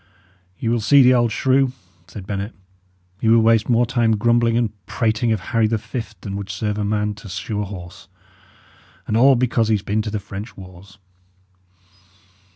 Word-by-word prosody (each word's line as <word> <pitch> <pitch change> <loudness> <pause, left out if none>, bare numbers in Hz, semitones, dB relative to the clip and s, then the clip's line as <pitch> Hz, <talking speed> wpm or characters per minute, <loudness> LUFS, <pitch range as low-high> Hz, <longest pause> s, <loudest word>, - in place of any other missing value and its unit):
"Ye - - -4
will 120 +1 +1
see 135 +6 +6
the 125 +1 +6
old 120 -2 +2
shrew," 130 +1 +2 0.3
said 100 -3 -9
Bennet. 100 +2 -4 0.6
"He 110 - +1
will 115 0 +6
waste 115 0 +3
more 120 0 +3
time 115 -2 +1
grumbling 120 +1 +2
and 115 -3 0 0.2
prating 115 0 0
of 110 - +1
Harry 110 +4 0
the 115 +1 0
Fift 115 +2 -7
than 100 -2 -6
would 100 -1 -6
serve 105 +1 -3
a - - -1
man 105 0 -1
to 105 0 -12
shoe 95 +3 -4
a - - -2
horse. 95 0 -10 1.0
And 110 - -2
all 130 +4 +6
because 120 -2 +1
he 110 - +3
has 100 - -4
been 105 +2 0
to 105 - -4
the 105 0 -3
French 100 +3 -9
wars!" 95 +1 -13
110 Hz, 185 wpm, -21 LUFS, 100-120 Hz, 1.0 s, see